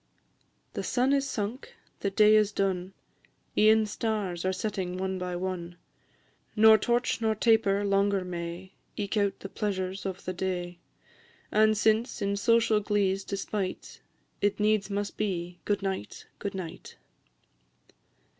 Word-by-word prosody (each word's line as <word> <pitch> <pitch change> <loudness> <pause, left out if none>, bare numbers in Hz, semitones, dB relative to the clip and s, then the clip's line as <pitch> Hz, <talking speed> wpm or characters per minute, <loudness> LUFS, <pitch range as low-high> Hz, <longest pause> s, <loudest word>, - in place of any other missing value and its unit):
The - - -3
sun 255 +2 +1
is 275 -1 +1
sunk, 225 +3 -4 0.2
the 200 - 0
day 210 +2 +5
is 210 -1 +4
done, 190 -2 -1 0.6
E'en 220 +1 +5
stars 205 -5 -2
are 185 - +1
setting 190 -2 -3
one 190 0 -2
by 180 -1 -3
one; 175 -1 -4 0.8
Nor 220 0 +7
torch 240 +2 0
nor 220 -1 +1
taper 205 -3 +3
longer 200 -1 +2
may 175 +1 -6 0.2
Eke 205 0 -2
out 200 -1 0
the - - -5
pleasures 190 -2 -3
of 190 -1 -6
the 185 - -2
day; 180 -1 -3 0.7
And 215 0 +4
since, 220 +4 +2
in 200 -1 0
social 225 +1 +3
glee's 200 -2 0
despite, 195 -1 -4 0.4
It 205 +1 +1
needs 210 -1 +2
must 200 0 -3
be, 180 -4 -3
Good 205 -1 0
night, 190 - -4
good 200 -1 -4
night! 180 -4 -7
200 Hz, 135 wpm, -28 LUFS, 185-215 Hz, 0.8 s, Nor